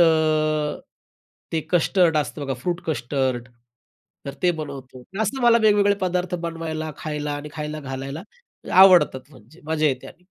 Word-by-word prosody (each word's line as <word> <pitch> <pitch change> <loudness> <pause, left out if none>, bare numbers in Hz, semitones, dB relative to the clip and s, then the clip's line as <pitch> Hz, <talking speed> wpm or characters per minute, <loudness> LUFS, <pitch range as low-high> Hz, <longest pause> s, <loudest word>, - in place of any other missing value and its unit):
अ, 155 -2 +2 0.7
ते 160 - +1
कस्टर्ड 175 -1 +3
असतं 145 -1 -2
बघा, 135 -1 -2
फ्रूट 175 +5 -2
कस्टर्ड 130 -3 -1 0.8
तर 140 - -5
ते 180 - +4
बनवतो. 135 -3 -8 0.2
असं 255 +6 -2
मला 235 -1 +6
वेगवेगळे 205 -1 +4
पदार्थ 180 -1 -1
बनवायला, 160 -1 -4
खायला 150 -1 -4
आणि 150 - -8
खायला 155 0 -5
घालायला 135 +3 -6 0.5
आवडतात 180 -8 +6
म्हणजे 135 +4 -18
मजा 155 0 +1
येते 130 -3 -1
आणि. 180 - -15
155 Hz, 140 wpm, -23 LUFS, 140-175 Hz, 0.8 s, मला